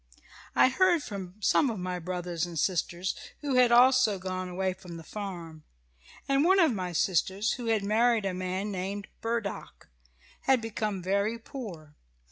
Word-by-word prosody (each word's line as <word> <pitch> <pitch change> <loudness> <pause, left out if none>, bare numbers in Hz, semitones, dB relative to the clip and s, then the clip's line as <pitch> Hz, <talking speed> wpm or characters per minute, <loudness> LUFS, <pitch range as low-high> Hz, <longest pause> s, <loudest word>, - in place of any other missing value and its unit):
"I - - +6
heard 345 +3 +3
from 195 -6 -7
some 270 +6 +3
of 225 - -3
my 180 0 -3
brothers 175 -1 -3
and 170 -1 -7
sisters 175 +2 0 0.3
who 285 -2 -2
had 250 -1 +5
also 245 -3 +5
gone 185 0 -4
away 185 +1 -1
from 175 -2 -10
the 165 - -10
farm, 170 -5 -7 0.6
and 275 +1 +3
one 380 +3 +5
of 320 -8 +4
my 185 -3 -3
sisters, 190 +5 +1
who 240 -2 -5
had 220 -3 +2
married 225 +1 +2
a 190 - -1
man 185 +3 -3
named 195 +2 -4
Burdock, 225 -3 -4 0.6
had 265 -1 +4
become 215 -4 -3
very 200 +4 0
poor. 200 - -9
200 Hz, 160 wpm, -29 LUFS, 180-235 Hz, 0.6 s, I